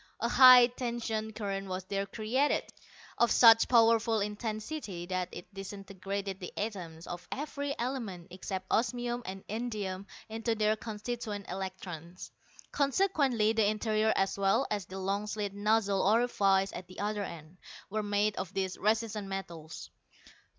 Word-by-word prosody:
A - - 0
high 255 -2 +9
tension 235 -3 -3
current 195 -2 -4
was 185 0 -4
there 195 +1 -2
created, 235 +8 +1 0.6
of 235 - +5
such 225 -2 +7
powerful 230 -1 +4
intensity 210 - -4
that 185 0 -2
it 175 +3 -10
disintegrated 195 0 -5
the 180 - -7
atoms 175 -6 -5
of 175 0 -7
every 285 0 -3
element 225 -8 -4
except 185 +1 -5
osmium 240 +1 0
and 190 0 -7
indium 205 -4 -4 0.2
into 225 +1 -2
their 215 0 +2
constituent 215 -1 -5
electrons. 185 -2 -6 0.4
Consequently 275 - +2
the 220 -2 +3
interior 215 0 +1
as 195 +1 0
well 200 +7 +3
as 205 -4 -2
the 190 - -7
long 195 +2 -1
slit 205 -1 -3
nozzle 205 -1 +2
orifice 200 -3 +3
at 180 - -7
the 185 - -12
other 210 0 -1
end, 165 -1 -9 0.3
were 215 +1 0
made 205 0 +1
of 185 - -4
these 190 -1 -2
resistant 215 -1 0
metals. 170 -5 -7
210 Hz, 140 wpm, -31 LUFS, 195-225 Hz, 0.6 s, high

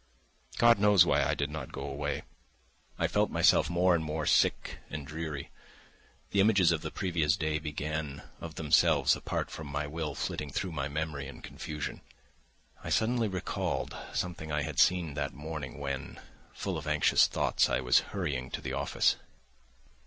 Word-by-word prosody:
God 120 -2 +6
knows 100 -3 +6
why - - +3
I - - +1
did 70 0 -2
not 80 - -6
go 70 - -6
away. 70 +1 -3 0.7
I - - +1
felt - - +1
myself 75 - +4
more 90 +1 +3
and 85 -2 +1
more 75 0 -3
sick - - +2
and 75 -1 -5
dreary. 75 -2 -5 0.8
The 100 - +1
images 100 -4 +5
of 80 -2 0
the - - -4
previous 85 -5 0
day 80 -1 -1
began 75 -1 -4 0.2
of 80 -2 -8
themselves, 75 -3 +4
apart - - -3
from 80 - -7
my 75 +1 -2
will, 75 0 -4
flitting 75 - -3
through 90 +7 -3
my 75 -3 -2
memory 75 -2 -3
in 70 - -11
confusion. 75 -1 -6 0.8
I - - -5
suddenly 115 0 +2
recalled 95 -3 -3 0.2
something 85 -3 -3
I 75 -1 0
had 75 -3 -3
seen 85 -5 +3
that 70 -1 -3
morning 75 -3 -6
when, 70 -2 -5 0.3
full 95 -5 -3
of 75 - -9
anxious 75 0 +4
thoughts, - - +1
I - - +1
was 60 -1 +4
hurrying 70 -10 -3
to - - -3
the - - -4
office. - - +2
75 Hz, 165 wpm, -30 LUFS, 70-85 Hz, 0.8 s, God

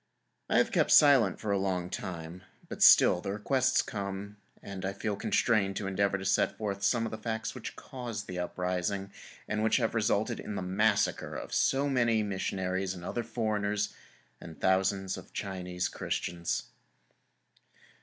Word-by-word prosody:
I - - +3
have - - +3
kept - - +2
silent 135 -10 +6
for 105 - -2
a 100 - +2
long 95 -2 -1
time, 85 0 -6 0.3
but - - -8
still 90 - +7
the 100 0 -3
requests 130 +5 +2
come, 100 -1 -5 0.3
and 100 -1 -7
I 95 +1 -2
feel 105 0 -2
constrained 100 -1 +1
to 100 - -3
endeavor 100 +1 +1
to 95 - -7
set - - +2
forth 100 -2 -3
some 115 +1 +2
of 115 - -4
the 110 - -6
facts 110 -1 -3
which - - -7
caused 120 -5 -6
the 90 -1 -5
uprising 90 +2 -2 0.4
and 110 0 -1
which 110 - +3
resulted 110 -3 0
in 105 - -5
the 95 - -3
massacre 100 +3 +1
of - - -6
so 140 +1 +2
many 120 -5 +2
missionaries 95 -1 -2
and 90 -1 -9
other 120 - -2
foreigners, 105 -3 -1 0.5
and 80 -1 -10
thousands 95 0 +1
of - - -12
Chinese 90 -2 -3
Christians. 85 -1 -3
100 Hz, 160 wpm, -30 LUFS, 95-110 Hz, 0.5 s, still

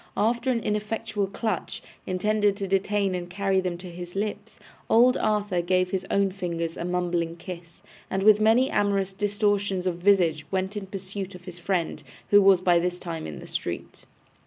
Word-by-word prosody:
After 235 +4 +1
an 240 -2 +1
ineffectual 210 -1 -2
clutch, 215 +3 -3 0.2
intended 205 +2 +1
to 200 -2 -3
detain 195 0 +1
and 175 -1 -4
carry 195 +1 +1
them 180 -2 -3
to 180 0 -9
his 175 +1 -8
lips, 210 +1 -4 0.3
old 245 +3 +6
Arthur 205 -4 0
gave 185 +1 +1
his 190 0 -2
own 200 -1 +2
fingers 170 -3 -3
a - - -5
mumbling 175 -2 -1
kiss, 170 -1 -10 0.3
and 190 0 -1
with 215 0 +6
many 230 +5 +4
amorous 195 -2 +1
distortions 205 -2 0
of 180 -2 0
visage 175 -5 +3
went 190 +1 -2
in 200 -2 -5
pursuit 195 0 -6
of 180 0 -13
his 180 -1 -8
friend, 175 -1 -1 0.3
who 205 0 +8
was 195 -2 +6
by 175 -2 +4
this 180 +1 -1
time 165 -3 -5
in 75 - -7
the - - -10
street. - - -5
195 Hz, 180 wpm, -26 LUFS, 180-205 Hz, 0.3 s, who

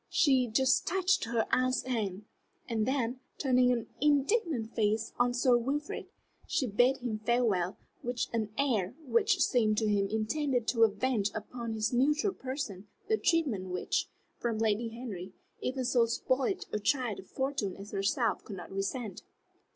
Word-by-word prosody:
She 265 -6 +3
just 260 +4 +2
touched 380 -1 +2
her 230 -1 0
aunt's 255 0 +2
hand, 210 -6 -2 0.4
and 225 -2 0
then, 255 -2 0 0.2
turning 255 -2 +3
an 235 -2 0 0.2
indignant 290 - +2
face 220 +1 0
on 245 0 +4
Sir 245 0 +3
Wilfrid, 285 +5 -3 0.4
she 290 - +1
bade 245 +4 +3
him 235 -4 -3
farewell 215 -6 +1 0.2
with 245 0 -1
an 220 -2 0
air 235 -7 +1
which 415 - +2
seemed 215 -4 +2
to 220 - +2
him 200 -1 +2
intended 240 +3 0
to 230 -2 +5
avenge 215 0 0
upon 230 +1 -5
his 220 +2 -1
neutral 300 +10 +2
person 255 -8 -5 0.2
the 440 - +3
treatment 310 - +1
which, 180 0 -1 0.3
from 235 -2 -1
Lady 220 +1 +1
Henry, 220 -6 -7 0.3
even 255 0 -2
so 240 -2 +3
spoiled 270 - 0
a 210 - 0
child 245 -1 0
of 190 - -11
fortune 265 -8 -2
as 200 +1 -9
herself 205 +3 0
could 200 - -7
not 175 - -9
resent. 195 +3 -3
240 Hz, 155 wpm, -31 LUFS, 215-265 Hz, 0.4 s, to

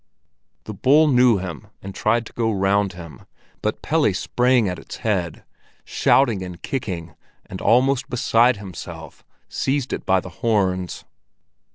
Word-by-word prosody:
The 110 - -7
bull 145 +10 +4
knew 125 -4 +4
him 90 -4 -7
and 100 0 -9
tried 115 +4 0
to - - -12
go 115 -1 0
round 100 0 +1
him, 85 -2 -12 0.3
but - - -3
Pelle - - +2
sprang 125 -3 +2
at 90 -1 -4
its - - -9
head, 90 -7 -1 0.4
shouting 115 -8 +2
and 90 -2 -7
kicking 90 - -5 0.3
and 95 - -8
almost 130 +3 +2
beside 120 0 +3
himself, 85 -5 -10 0.2
seized 135 -1 -2
it - - -4
by 95 0 +2
the 90 - -9
horns. 95 -6 0
105 Hz, 145 wpm, -22 LUFS, 90-125 Hz, 0.4 s, bull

